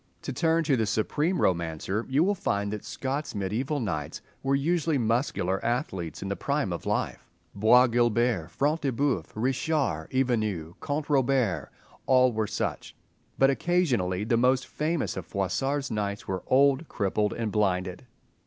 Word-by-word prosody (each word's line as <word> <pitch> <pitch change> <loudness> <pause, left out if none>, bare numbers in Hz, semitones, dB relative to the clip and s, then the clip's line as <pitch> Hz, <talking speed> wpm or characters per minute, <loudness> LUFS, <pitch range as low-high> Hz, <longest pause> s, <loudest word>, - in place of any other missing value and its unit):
To - - -4
turn 165 +4 +2
to 145 -3 +2
the 110 -3 0
supreme 150 - 0
romancer, 85 +4 -1
you 140 +4 +3
will 200 +3 +2
find 100 - -1
that 105 - -5
Scott's 140 0 -4
mediaeval 115 +10 -1
knights 80 -10 -3 0.2
were 135 0 +1
usually 160 +1 +1
muscular 115 -6 0
athletes 95 - -2
in - - -4
the - - -2
prime - - -1
of - - -6
life: - - -2 0.2
Bois 115 +5 +6
Guilbert, 120 -6 +1
Front 150 - 0
de 140 - 0
Bœuf, 125 - 0
Richard, 130 - 0
Ivanhoe, 110 -11 0
Count 145 +1 -2
Robert—they 130 - 0
all 130 -1 +5
were 110 -1 -1
such. - - -3 0.4
But 135 0 +5
occasionally 130 - +1
the 115 +2 +1
most 130 +2 +3
famous 155 +1 -2
of - - -6
Froissart's 135 +9 -1
knights 100 -2 -3
were 95 -1 -2
old, 140 +3 +4
crippled 105 0 0
and 115 -2 -3
blinded. 95 +1 -1
120 Hz, 155 wpm, -27 LUFS, 100-140 Hz, 0.4 s, Bois